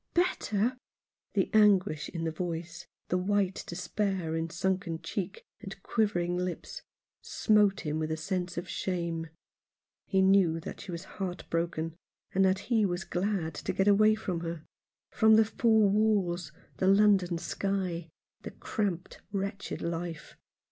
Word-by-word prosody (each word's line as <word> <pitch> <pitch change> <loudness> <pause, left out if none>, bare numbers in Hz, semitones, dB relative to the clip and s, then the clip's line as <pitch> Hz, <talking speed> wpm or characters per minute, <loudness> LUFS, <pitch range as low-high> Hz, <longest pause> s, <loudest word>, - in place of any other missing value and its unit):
" - - -49
Better! 250 - +1 0.3
" - - -53
The - - +1
anguish 200 -7 +4
in 165 -2 -4
the 165 - -1
voice, 170 0 -5 0.2
the 180 - +1
white 195 0 0
despair 185 -2 -2
in 165 0 -2
sunken 185 -1 -1
cheek 195 -1 -4
and 195 0 -9
quivering 180 -6 0
lips, 180 -1 -4 0.4
smote 210 -2 +3
him 155 -2 -2
with 155 0 -2
a 160 - -1
sense 180 +2 -3
of 175 +1 -3
shame. 170 -4 -2 0.8
He 190 -1 +3
knew 190 -4 +4
that - - -7
she - - -7
was 170 +1 -5
heart 180 -4 -6
broken, 165 -1 -1 0.4
and 195 - +3
that 190 0 +4 0.2
he 220 -2 +4
was 175 -2 0
glad 180 -4 -1
to - - -3
get 195 - +1
away 215 +1 +6
from 185 -6 -3
her; 165 -1 -5 0.5
from 220 -1 +5
the 220 - +7
foar 220 0 +3
walls; 195 -6 +1 0.3
the 190 - +1
London 195 -3 +4
sky; 180 -2 -2 0.3
the - - -6
cramped, 190 -5 -3
wretched 200 0 -3
life. 170 -1 -4
185 Hz, 150 wpm, -30 LUFS, 170-205 Hz, 0.8 s, the